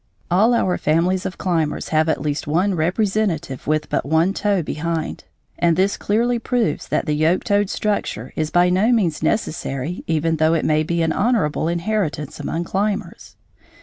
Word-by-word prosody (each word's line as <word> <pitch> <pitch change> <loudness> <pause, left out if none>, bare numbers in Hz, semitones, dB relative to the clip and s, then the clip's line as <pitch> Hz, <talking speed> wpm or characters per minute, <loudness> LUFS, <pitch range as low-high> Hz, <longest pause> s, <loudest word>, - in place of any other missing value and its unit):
All 215 +7 +4
our 185 -5 +1
families 175 +4 +1
of 185 - -8
climbers 165 -5 -1
have 155 0 +2
at - - 0
least 145 -1 -2
one 180 +6 +1
representative 180 - -1
with 155 0 0
but - - -1
one 160 +6 +2
toe 200 -4 0
behind, 160 +1 -3 0.3
and 170 -1 +3
this 195 +2 +2
clearly 235 +3 0
proves 235 - -1
that - - 0
the 150 - 0
yoke 155 +4 +2
toed 205 -1 +1
structure 165 - -2
is 155 -1 -1
by 175 +2 +3
no 200 +6 +3
means 185 -10 +1
necessary 155 - -2
even 160 0 +1
though 160 +1 +3
it 165 - 0
may 155 0 +2
be 170 +1 0
an 160 - +1
honorable 200 -10 +1
inheritance 170 -5 -2
among 170 - -2
climbers. 200 +4 -3
170 Hz, 170 wpm, -21 LUFS, 155-200 Hz, 0.3 s, All